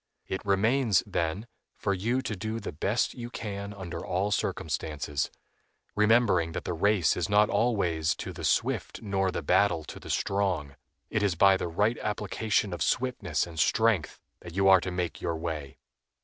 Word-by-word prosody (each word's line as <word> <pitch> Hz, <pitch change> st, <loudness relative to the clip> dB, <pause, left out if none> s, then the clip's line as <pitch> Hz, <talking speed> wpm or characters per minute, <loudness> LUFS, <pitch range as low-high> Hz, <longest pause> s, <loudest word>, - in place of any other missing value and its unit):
It 95 Hz, -, -4 dB
remains, 110 Hz, +1 st, +3 dB
then, 85 Hz, +6 st, -2 dB, 0.3 s
for 100 Hz, -, -1 dB
you 120 Hz, +8 st, 0 dB
to 110 Hz, -, -3 dB
do 110 Hz, +4 st, -4 dB
the -, -, -5 dB
best 100 Hz, +10 st, 0 dB
you 120 Hz, -2 st, -7 dB
can 100 Hz, -3 st, -5 dB
under 90 Hz, -4 st, -6 dB
all 95 Hz, +3 st, -1 dB
circumstances, 75 Hz, -7 st, -2 dB, 0.7 s
remembering 105 Hz, -6 st, +3 dB
that -, -, -4 dB
the 90 Hz, -, -3 dB
race 95 Hz, 0 st, +2 dB
is -, -, -2 dB
not 105 Hz, +1 st, +4 dB
always 95 Hz, -8 st, +1 dB
to -, -, -6 dB
the -, -, -8 dB
swift -, -, 0 dB
nor 95 Hz, -2 st, 0 dB
the 85 Hz, -, -3 dB
battle 85 Hz, 0 st, +3 dB
to -, -, -9 dB
the -, -, -11 dB
strong. 90 Hz, -8 st, -1 dB, 0.4 s
It 105 Hz, -, +1 dB
is 100 Hz, -4 st, +1 dB
by 95 Hz, +3 st, +6 dB
the 95 Hz, -, -2 dB
right 105 Hz, +8 st, +1 dB
application 105 Hz, -1 st, -1 dB
of 85 Hz, -, -6 dB
swiftness 100 Hz, -, 0 dB
and 85 Hz, -2 st, -8 dB
strength 110 Hz, -6 st, +2 dB, 0.2 s
that 85 Hz, -1 st, -10 dB
you 95 Hz, 0 st, +3 dB
are 95 Hz, -2 st, +7 dB
to 95 Hz, -, -3 dB
make 90 Hz, -2 st, -3 dB
your 85 Hz, -, -1 dB
way. 80 Hz, -4 st, -5 dB
95 Hz, 175 wpm, -28 LUFS, 85-105 Hz, 0.7 s, are